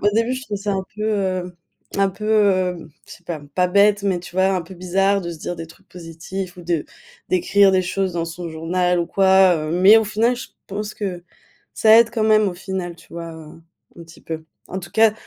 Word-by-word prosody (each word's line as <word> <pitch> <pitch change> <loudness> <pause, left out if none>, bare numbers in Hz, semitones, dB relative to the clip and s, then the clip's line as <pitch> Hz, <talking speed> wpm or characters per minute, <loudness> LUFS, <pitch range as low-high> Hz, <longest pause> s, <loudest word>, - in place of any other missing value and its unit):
au 205 - +3
début 230 +3 +1
je 260 +1 -5
faisais 205 0 -3
un 190 -1 -1
peu, 210 - -5 0.4
heu 180 -1 -13 0.4
un 195 0 +3
peu, 210 +1 +2 0.3
hem, 160 - -12 0.2
je - - -12
sais 175 - -20
pas, 165 -4 -5
pas 180 -1 +3
bête, 200 +2 +3
mais 190 -3 +1
tu 175 0 -12
vois, 190 0 +4
un 180 - -1
peu 185 +3 -12
bizarre 195 +3 +1
de 170 -1 -5
se 160 - -10
dire 175 - -5
des 165 0 -7
trucs 165 - -20
positifs 175 +2 -7
ou 175 - -10
de 170 -3 -2 0.4
d'écrire 195 +2 +4
des 185 0 +3
choses 190 +1 -2
dans 165 -1 -1
son 170 +1 -6
journal 175 +3 0
ou 170 - -2
quoi, 190 -1 +4
heu. 155 0 -4
Mais 190 +5 +7
au 220 - 0
final, 225 +4 +1
je - - -8 0.2
pense 210 +1 -5
que 185 -4 -4 0.5
ça 220 +1 +6
aide 230 0 +4
quand 225 -2 -1
même 215 -2 +4
au 175 - -5
final, 180 -1 -5
tu - - -19
vois, 170 -1 -7
heu, 160 0 -12 0.4
un 170 - -10
petit 165 - -16
peu. 160 -1 -6 0.2
En 190 - -4
tout 175 -1 -9
cas 220 +1 +4
185 Hz, 230 wpm, -21 LUFS, 170-205 Hz, 0.5 s, Mais